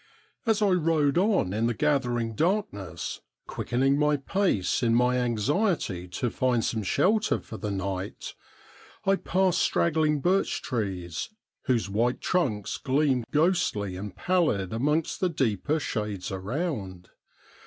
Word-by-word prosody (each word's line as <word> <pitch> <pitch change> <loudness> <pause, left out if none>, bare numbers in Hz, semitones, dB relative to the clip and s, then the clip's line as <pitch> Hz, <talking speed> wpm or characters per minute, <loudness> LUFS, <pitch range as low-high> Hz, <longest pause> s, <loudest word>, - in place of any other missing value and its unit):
As 215 -1 +3
I 205 - +4
rode 160 -4 +2
on 190 - +2
in 110 +2 +1
the 120 - -1
gathering 120 -6 0
darkness, 155 - -2 0.2
quickening 135 +3 0
my 150 0 +3
pace 140 - 0
in 115 -2 +3
my 125 +1 +3
anxiety 120 - 0
to 110 +7 -2
find 125 -3 +1
some 110 - -1
shelter 205 - +2
for 110 - -9
the 105 - -4
night, 95 0 -4 0.7
I 195 0 +4
passed 185 -2 +1
strag 170 - +2
gling 155 -1 +2
birch 185 +6 +1
trees, 95 - -3 0.4
whose 120 -7 +1
white 115 +5 0
trunks 120 - -1
gleamed 135 -3 +1
ghostly 150 - +1
and 100 +2 -7
pallid 160 - +1
amongst 150 +7 0
the 185 - +1
deeper 145 - 0
shades 105 -7 -3
around. 95 - -4
125 Hz, 135 wpm, -27 LUFS, 105-165 Hz, 0.7 s, I